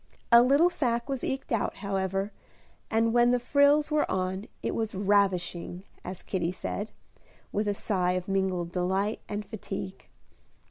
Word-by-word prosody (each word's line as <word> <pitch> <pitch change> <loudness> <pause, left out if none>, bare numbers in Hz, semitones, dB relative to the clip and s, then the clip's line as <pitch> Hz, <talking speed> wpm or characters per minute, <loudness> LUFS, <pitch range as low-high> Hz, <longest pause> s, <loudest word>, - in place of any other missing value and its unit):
A 235 0 +9
little 285 +8 +5
sacque 240 -8 0
was 270 -2 -2
eked 270 0 -3
out, 230 -4 0
however, 195 0 -2 0.6
and 225 +1 +2
when 240 0 +5
the 250 0 +3
frills 285 +4 +4
were 300 0 +2
on, 190 +2 -2 0.2
it - - -1
was 220 -2 -2
"ravishing," 190 -3 +1 0.2
as 185 0 -7
Kitty 175 -3 -1
said, 205 +3 -4 0.6
with 210 +1 -1
a 205 - +1
sigh 180 -4 0
of 185 0 -3
mingled 190 -3 0
delight 190 +4 0
and 210 0 -3
fatigue. 195 -3 -6
200 Hz, 150 wpm, -28 LUFS, 190-235 Hz, 0.6 s, A